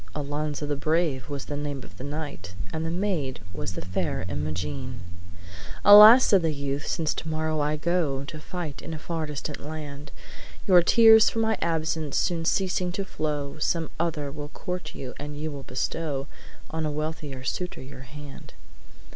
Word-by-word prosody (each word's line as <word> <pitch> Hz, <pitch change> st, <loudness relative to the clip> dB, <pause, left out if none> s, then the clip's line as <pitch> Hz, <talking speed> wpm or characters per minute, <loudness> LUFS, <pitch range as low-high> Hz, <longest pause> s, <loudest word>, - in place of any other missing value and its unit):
Alonzo 150 Hz, 0 st, -3 dB
the 145 Hz, 0 st, -1 dB
brave 155 Hz, -2 st, 0 dB
was 140 Hz, -2 st, -4 dB
the 145 Hz, -, -4 dB
name 145 Hz, -2 st, -4 dB
of 95 Hz, -, -13 dB
the -, -, -6 dB
knight, 145 Hz, -9 st, -6 dB, 0.2 s
And 160 Hz, -, -2 dB
the 165 Hz, -, -2 dB
maid 170 Hz, -, -1 dB
was 95 Hz, -, -4 dB
the 90 Hz, -, -6 dB
fair 90 Hz, 0 st, -2 dB
Imogene. 75 Hz, -2 st, -4 dB, 0.8 s
"Alas!' 210 Hz, +5 st, +11 dB
said 195 Hz, -3 st, +5 dB
the 165 Hz, -1 st, +1 dB
youth, 140 Hz, 0 st, -3 dB
'since 155 Hz, -2 st, 0 dB
tomorrow 155 Hz, 0 st, -2 dB
I 150 Hz, +1 st, +1 dB
go 155 Hz, -4 st, 0 dB
To 155 Hz, +2 st, -7 dB
fight 165 Hz, -3 st, -6 dB
in 160 Hz, -, -6 dB
a -, -, -5 dB
far 160 Hz, 0 st, -3 dB
distant 150 Hz, 0 st, -5 dB
land, 145 Hz, -1 st, -7 dB, 0.5 s
Your 180 Hz, -3 st, +7 dB
tears 220 Hz, +4 st, +7 dB
for -, -, -6 dB
my 220 Hz, 0 st, +2 dB
absence 160 Hz, -2 st, -1 dB
soon 170 Hz, -2 st, 0 dB
ceasing 180 Hz, 0 st, +1 dB
to 195 Hz, 0 st, -3 dB
flow, 150 Hz, -4 st, -3 dB
Some 165 Hz, +1 st, 0 dB
other 155 Hz, -4 st, -1 dB
will 145 Hz, 0 st, -7 dB
court 180 Hz, +4 st, -5 dB
you, 130 Hz, -2 st, -6 dB
and 145 Hz, 0 st, -6 dB
you 155 Hz, +1 st, -3 dB
will 140 Hz, -1 st, -7 dB
bestow 135 Hz, +2 st, -2 dB, 0.5 s
On 160 Hz, 0 st, -2 dB
a 155 Hz, -, -1 dB
wealthier 150 Hz, -3 st, -4 dB
suitor 180 Hz, +4 st, -3 dB
your 135 Hz, -1 st, -10 dB
hand.' 145 Hz, -1 st, -11 dB
150 Hz, 170 wpm, -26 LUFS, 140-165 Hz, 0.8 s, Alas